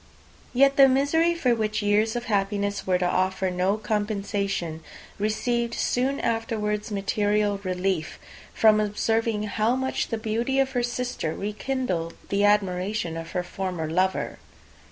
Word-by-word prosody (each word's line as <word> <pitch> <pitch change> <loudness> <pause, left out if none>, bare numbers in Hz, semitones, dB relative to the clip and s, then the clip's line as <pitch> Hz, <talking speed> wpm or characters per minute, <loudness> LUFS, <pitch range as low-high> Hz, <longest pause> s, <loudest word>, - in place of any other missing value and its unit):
Yet 275 +2 +4
the 275 -1 +9
misery, 285 +6 +2
for 255 -8 +2
which 215 -2 -1
years 210 +2 +2
of 240 0 -3
happiness 200 -1 -1
were 185 -1 +3
to 180 - -1
offer 185 +1 0
no 185 +3 +1
compensation, 200 -6 -2 0.4
received 235 +3 0
soon 265 +3 0
afterwards 220 -2 -1
material 205 0 0
relief, 185 -3 -1 0.3
from 215 -1 +5
observing 215 +1 0
how 215 +3 +1
much 265 0 -1
the 230 - -2
beauty 225 +4 -1
of 270 -1 +2
her 245 - 0
sister 245 -9 -2
rekindled 210 -5 -3
the 200 +1 +1
admiration 195 -3 +1
of 165 0 -7
her 180 -1 -1
former 180 -3 -4
lover. 185 +3 0
210 Hz, 135 wpm, -25 LUFS, 190-235 Hz, 0.4 s, the